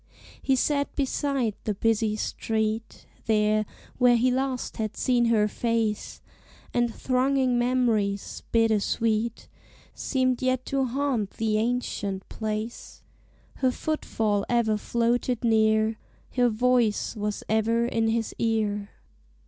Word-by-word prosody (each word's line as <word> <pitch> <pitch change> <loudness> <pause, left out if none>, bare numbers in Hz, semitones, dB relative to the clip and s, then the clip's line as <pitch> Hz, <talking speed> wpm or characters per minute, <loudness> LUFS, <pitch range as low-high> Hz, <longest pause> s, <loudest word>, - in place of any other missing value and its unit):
He 270 - +2
sat 285 +2 0
beside 270 -4 0
the 210 - -1
busy 220 0 +1
street, 220 +1 -2 0.2
There, 215 -1 +2 0.3
where 245 -1 +6
he 250 +2 +3
last 260 0 -2
had 215 -1 -3
seen 245 -2 +2
her 220 -2 +3
face: 225 -1 -2 0.5
And 240 -1 +1
thronging 255 0 +1
memories, 230 -5 0
bitter 225 -2 +3
sweet, 225 +2 -1 0.5
Seemed 255 -2 0
yet 255 0 0
to 270 -1 0
haunt 255 -5 -1
the 215 -1 +1
ancient 215 -5 -2
place: 215 +1 -5 0.5
Her 260 - +2
footfall 225 -8 -1
ever 235 -3 +2
floated 235 +2 0
near: 220 -1 +3 0.4
Her 245 -1 +4
voice 235 -1 +1
was 210 -1 -3
ever 225 +2 +2
in 225 -2 0
his 225 0 -1
ear. 210 -3 0
230 Hz, 115 wpm, -26 LUFS, 215-250 Hz, 0.5 s, where